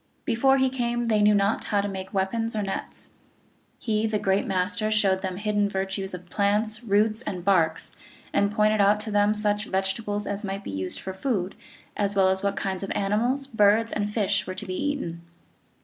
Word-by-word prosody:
Before 265 +3 +3
he 265 -1 +2
came 240 -2 -1
they 215 -1 +3
knew 210 0 +5
not 200 +1 +1
how 205 - +1
to 200 - 0
make 190 -1 -6
weapons 220 +4 -1
or 210 - 0
nets. 195 - -6 0.7
He 220 -1 0
the 215 -1 0
Great 195 -1 +1
Master 195 +3 0
showed 195 -3 +2
them 190 -2 -3
the 190 - -7
hid 210 0 -1
den 205 -1 +2
virtues 190 0 -3
of 180 0 -11
plants, 215 +4 0
roots, 215 +1 +2
and 185 -7 -5
barks, 165 -5 +2 0.4
and 200 0 +2
pointed 215 0 +3
out 205 +1 +4
to 215 - -5
them 205 +1 +3
such 210 0 +1
vegetables 205 +2 -2
as 205 +1 -3
might 195 0 -4
be - - -6
used 95 -1 -3
for 190 - -6
food, 190 -3 -2 0.4
as 200 -1 -1
well 190 -1 +4
as 190 0 0
what 200 0 0
kinds 190 -2 -3
of 195 - -5
animals, 235 +8 0
birds, 220 -2 +3
and 205 0 -2
fish 200 -3 0
were 185 - -4
to 195 - -7
be 185 - -4
eaten. 275 -10 -3
205 Hz, 205 wpm, -25 LUFS, 190-215 Hz, 0.7 s, knew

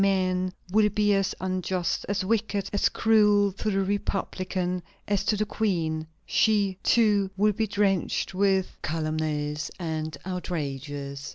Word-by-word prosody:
Men 185 -2 +1 0.2
will 210 +1 +4
be 210 0 +2
as 195 -1 +1
unjust, 185 -1 -1
as 200 -2 0
wicked, 210 -1 0
as 205 - +3
cruel 210 -2 +4
to 205 +3 -3
the 195 -1 +1
republican 185 -2 -2 0.3
as 205 -2 +1
to 215 - +2
the 215 - +1
queen. 165 -8 -1 0.2
She, 200 -4 +2
too, 210 -4 +3
will 210 +1 +3
be 220 +2 -1
drenched 195 -2 0
with 190 -1 +1
calumnies 155 -1 -2
and 160 -3 -3
outrages. 145 -6 -4
190 Hz, 130 wpm, -26 LUFS, 165-205 Hz, 0.3 s, will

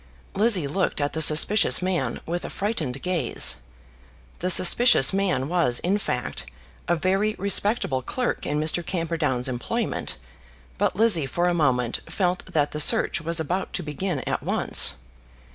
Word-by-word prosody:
Lizzie 205 -6 +2
looked 180 +4 -2
at 145 0 -2
the 160 - -3
suspicious 160 +7 +5
man 185 -1 -3
with 175 +2 -4
a - - -6
frightened 160 - -4
gaze. 180 -3 +1 0.8
The 180 - -2
suspicious 185 - +5
man 185 -9 -1
was, 165 -8 +1
in 195 +4 -1
fact, 125 -10 -5 0.4
a 175 - +1
very 195 +5 -1
respectable 200 - +1
clerk 250 - -3
in 150 +1 -2
Mr. 155 +3 +2
Camperdown's 165 -7 -2
employment, 125 -3 -4 0.6
but - - 0
Lizzie 200 -9 +3
for 175 +7 -1
a 175 - +1
moment 125 -7 0
felt 180 -2 -2
that 150 -2 -1
the 150 - -5
search 155 - +2
was 165 +1 -1
about 175 +5 -4
to 180 - -3
begin 150 0 -4
at - - -4
once. - - +3
170 Hz, 150 wpm, -23 LUFS, 145-190 Hz, 0.8 s, suspicious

